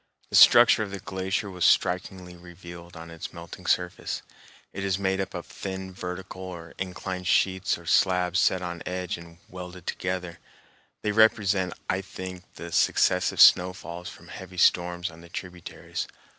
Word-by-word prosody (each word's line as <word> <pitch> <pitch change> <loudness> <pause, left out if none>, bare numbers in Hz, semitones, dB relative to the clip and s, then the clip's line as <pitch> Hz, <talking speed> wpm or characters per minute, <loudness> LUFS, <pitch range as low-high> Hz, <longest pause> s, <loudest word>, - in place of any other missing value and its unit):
The - - -1
structure 120 -2 +8
of 105 - -2
the 100 0 -6
glacier 95 +1 -2
was 90 -2 -4
strikingly 90 0 +1
revealed 85 0 -12
on 85 0 -10
its 85 -1 -7
melting 85 -2 -10
surface. - - -1 0.5
It 95 - -5
is 95 -2 0
made 95 0 0
up 95 - -5
of 90 - -5
thin 95 -1 -6
vertical 90 +1 -7
or 85 -3 -8
inclined 90 -1 -4
sheets 95 -1 +2
or 85 - -15
slabs 90 0 +3
set 95 -1 +2
on 85 -1 -5
edge 90 -1 -3
and 85 0 -13
welded 90 -1 -9
together. 90 -2 -3 0.6
They 105 - +1
represent, 105 -3 +3
I 95 - 0
think, 95 -1 -9
the 85 0 -8
successive - - +2
snowfalls 90 -1 +4
from - - -14
heavy 95 -1 -10
storms 90 0 +2
on 80 +1 -14
the 85 - -14
tributaries. 90 -1 -6
90 Hz, 155 wpm, -26 LUFS, 85-95 Hz, 0.6 s, structure